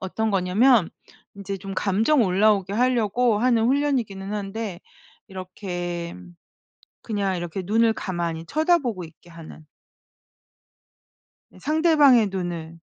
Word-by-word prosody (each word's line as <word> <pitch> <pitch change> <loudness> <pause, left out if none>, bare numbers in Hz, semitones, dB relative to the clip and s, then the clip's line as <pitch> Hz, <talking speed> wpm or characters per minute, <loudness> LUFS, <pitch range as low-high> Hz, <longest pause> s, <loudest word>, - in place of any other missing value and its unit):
어떤 220 +4 -2
거냐면 195 +3 +3 0.4
인제 195 -1 -6
좀 195 +1 -7
감정 220 +9 +2
올라오게 195 0 +2
하려고 240 -1 +1
하는 235 -1 +2
훈련이기는 240 -8 -1
한데 205 -2 -5 0.5
이렇게 180 -2 -6 0.9
그냥 200 -4 -2
이렇게 175 +2 -5
눈을 225 +4 +2
가만히 170 -5 -4
쳐다보고 290 - 0
있게 165 +2 -18
하는. 165 -2 -12 1.9
상대방의 300 -7 +4
눈을. 170 -3 -5
200 Hz, 245 characters per minute, -23 LUFS, 180-235 Hz, 1.9 s, 상대방의